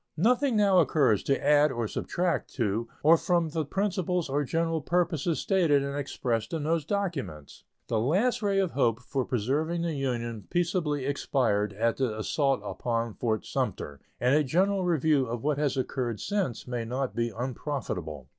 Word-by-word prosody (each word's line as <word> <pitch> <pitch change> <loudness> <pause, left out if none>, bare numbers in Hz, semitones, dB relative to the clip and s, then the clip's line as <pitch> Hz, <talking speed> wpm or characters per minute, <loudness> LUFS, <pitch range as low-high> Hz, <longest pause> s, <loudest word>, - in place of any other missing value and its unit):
Nothing 245 - +3
now 200 -3 +5
occurs 130 - +3
to 135 - 0
add 150 0 +5
or 120 -3 -2
subtract 175 - -2
to 115 -1 -1 0.2
or 160 +3 +7
from 170 -1 +1
the 160 +1 -1
principles 180 0 -1
or 145 +2 +1
general 165 +2 -1
purposes 170 -1 0
stated 165 -8 +2
and 140 0 -3
expressed 120 -5 -2
in 160 -3 -2
those 160 -1 0
documents. 165 - -4 0.2
The 110 - 0
last 190 - +1
ray 200 -2 +1
of 190 -3 +1
hope 120 -4 +1
for 130 +1 -2
preserving 145 +9 -1
the 170 -1 -1
Union 120 -6 -3
peaceably 165 -5 0
expired 115 -7 0
at 115 +3 0
the 125 -5 -1
assault 135 +5 0
upon 115 -2 -2
Fort 110 -2 -2
Sumter, 70 -1 -3 0.2
and 125 +2 +3
a 150 +1 +4
general 185 +7 +1
review 155 -5 +2
of 115 0 -4
what 145 -1 0
has 145 -3 0
occurred 125 -4 -2
since 195 - -2
may 120 -2 -2
not 125 +3 -3
be 120 0 0
unprofitable. 110 - -4
140 Hz, 165 wpm, -28 LUFS, 120-170 Hz, 0.2 s, or